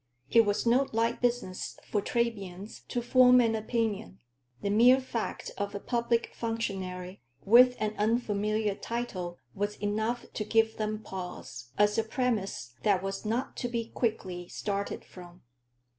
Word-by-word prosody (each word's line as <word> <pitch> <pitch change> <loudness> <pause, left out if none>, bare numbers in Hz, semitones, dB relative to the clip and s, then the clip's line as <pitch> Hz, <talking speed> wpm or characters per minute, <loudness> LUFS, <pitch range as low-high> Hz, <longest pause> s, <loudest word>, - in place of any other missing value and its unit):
It 230 -2 +6
was 205 +3 0
no 255 +4 +4
light 230 +1 0
business 240 -7 -1
for 205 - +2
Trebians 205 -4 -3
to 240 - -2
form 250 0 +6
an 230 -2 +3
opinion; 220 - -2 0.5
the 200 - 0
mere 245 +5 +6
fact 245 -3 -4
of 205 0 -2
a - - -2
public 235 +1 0
functionary 190 -5 -4 0.2
with 250 +4 +7
an 215 0 -1
unfamiliar 215 -1 +1
title 195 -6 -4 0.2
was 205 +1 -2
enough 220 +4 -1
to 215 - -2
give 225 +1 +2
them 215 0 -2
pause, 180 -9 -7
as 210 +1 +3
a - - +2
premise 220 - -2
that 195 -3 +2
was 195 +2 -4
not 240 +5 -1
to 245 - -2
be 230 -1 -3
quickly 185 -7 -2
started 200 +1 -3
from. 175 -1 -13
215 Hz, 145 wpm, -29 LUFS, 200-235 Hz, 0.5 s, with